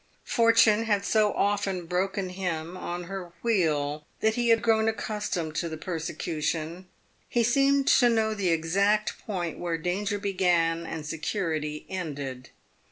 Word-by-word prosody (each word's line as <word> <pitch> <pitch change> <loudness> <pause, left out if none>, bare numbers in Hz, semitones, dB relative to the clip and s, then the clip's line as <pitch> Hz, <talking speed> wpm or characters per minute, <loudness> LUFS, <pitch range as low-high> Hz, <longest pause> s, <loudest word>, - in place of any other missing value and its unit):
Fortune 230 -2 +4
had 205 -2 +1
so 215 -1 +3
often 200 -3 0
broken 185 +2 -1
him 180 -2 -3
on 175 -1 -5
her 180 -1 -7
wheel 150 -9 +1
that 220 0 +3
he 240 0 0
had 230 0 +4
grown 220 -1 +3
accustomed 210 -7 -2
to 170 - -1
the 160 - -5
persecution. 165 0 -3 0.4
He 240 - +2
seemed 275 +3 +3
to 245 -2 +6
know 220 -2 +2
the 200 -4 0
exact 200 +6 +1
point 175 -6 -3
where 170 -2 -1
danger 195 +5 -1
began 175 -4 +1
and 160 -2 -5
security 155 -2 -3
ended. 145 -8 -5
185 Hz, 140 wpm, -27 LUFS, 165-215 Hz, 0.4 s, to